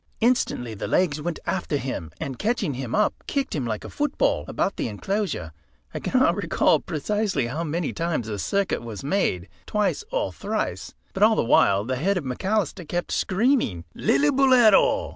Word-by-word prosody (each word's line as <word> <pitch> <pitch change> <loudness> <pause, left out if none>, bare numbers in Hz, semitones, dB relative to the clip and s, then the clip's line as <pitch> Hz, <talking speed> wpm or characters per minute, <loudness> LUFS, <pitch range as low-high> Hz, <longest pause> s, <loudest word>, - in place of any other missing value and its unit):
Instantly 230 - +1
the 100 - -5
legs 155 -5 +1
went 170 +1 -3
after 170 -5 -1
him, 125 - -4
and 135 -2 -5
catching 210 - 0
him 125 -2 -4
up 210 - +3
kicked 275 -1 -1
him 135 -6 -2
like 110 -2 -3
a - - -7
football 295 -1 0
about 195 - -1
the - - -2
enclosure. 145 - -3 0.4
I - - -3
cannot - - +2
recall - - +2
precisely 195 - -1
how 145 +8 -3
many 165 +2 -2
times 165 -8 -1
the 105 -2 -4
circuit 200 - 0
was 115 -2 -7
made, 135 - 0 0.2
twice 210 - 0
or - - -1
thrice, - - -3 0.2
but 190 - -5
all 220 +1 +6
the - - +1
while 100 -3 +4
the 130 +3 -2
head 190 +8 +1
of 175 - -2
McAlister 185 - -2
kept 175 0 -2
screaming 190 - +1
"Lillibulero!" 240 - +4
170 Hz, 170 wpm, -24 LUFS, -, 0.4 s, all